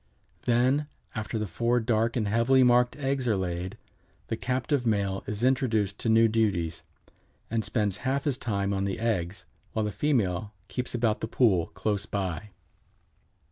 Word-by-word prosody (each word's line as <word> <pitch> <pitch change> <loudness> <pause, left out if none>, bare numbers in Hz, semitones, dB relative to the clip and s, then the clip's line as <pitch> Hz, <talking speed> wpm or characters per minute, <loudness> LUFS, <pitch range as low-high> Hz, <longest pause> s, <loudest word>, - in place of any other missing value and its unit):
Then 130 +5 +2 0.3
after 110 +1 -3
the 110 - -1
four 120 +6 +1
dark 115 0 +1
and 110 -4 0
heavily 115 +5 +4
marked 125 0 +4
eggs 135 -2 -1
are 110 - +3
laid 90 0 -3 0.5
the - - 0
"captive 130 +3 -1
male 100 -4 0
is 105 +2 -3
introduced 110 -6 +1
to 115 - -1
new 115 +1 +6
duties, 100 -7 0 0.7
and 115 -1 0
spends 105 -5 0
half 135 +2 -1
his 140 -4 0
time 100 -3 -1
on 95 0 0
the 95 - -2
eggs, 105 -5 -1 0.3
while 110 -1 0
the 105 - -2
female 105 - 0 0.2
keeps 125 -1 -3
about 115 -2 +1
the - - -2
pool 100 -9 +3
close 100 +2 -1
by." 95 -1 -3
110 Hz, 160 wpm, -28 LUFS, 100-125 Hz, 0.7 s, new